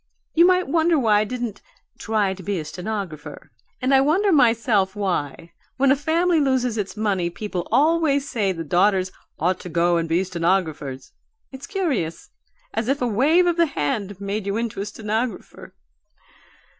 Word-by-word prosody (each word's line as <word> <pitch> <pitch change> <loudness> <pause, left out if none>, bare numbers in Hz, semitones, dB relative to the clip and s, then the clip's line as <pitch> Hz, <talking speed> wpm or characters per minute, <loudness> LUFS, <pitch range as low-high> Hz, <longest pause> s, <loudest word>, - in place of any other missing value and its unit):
You 340 +2 +6
might 365 0 +3
wonder 325 +3 +2
why 220 -6 +3
I 215 - +1
didn't 240 -3 -5 0.4
'try 210 -3 0
to 190 - -11
be 195 +2 -2
a 155 - -4
stenographer' 170 -4 -6 0.3
and 260 +2 +1
I 265 - +6
wonder 365 +9 +2
myself 230 - +3
why, 170 -5 -3 0.3
when 275 0 +4
a - - +5
family 330 +4 +1
loses 260 -4 +1
its 210 -1 -4
money, 195 -5 0
people 180 -1 -5
always 290 +1 +2
say 205 -7 0
the 165 -3 -5
daughters 185 +4 +2 0.3
'ought 180 +3 0
to 180 - -8
go 170 +1 +2
and 165 -1 -2
be 170 +3 +2
stenographers.' 165 -7 -2 0.4
It's 270 +1 -9
curious! 270 - -2 0.4
as 225 - -2
if 275 +2 +1
a 245 - 0
wave 290 - +3
of 345 -1 +1
the 335 -1 +4
hand 200 - -3
made 200 +1 -4
you 200 +2 -1
into 230 -4 -3
a 200 - -4
stenographer. 220 +1 -4
210 Hz, 170 wpm, -22 LUFS, 185-275 Hz, 0.4 s, You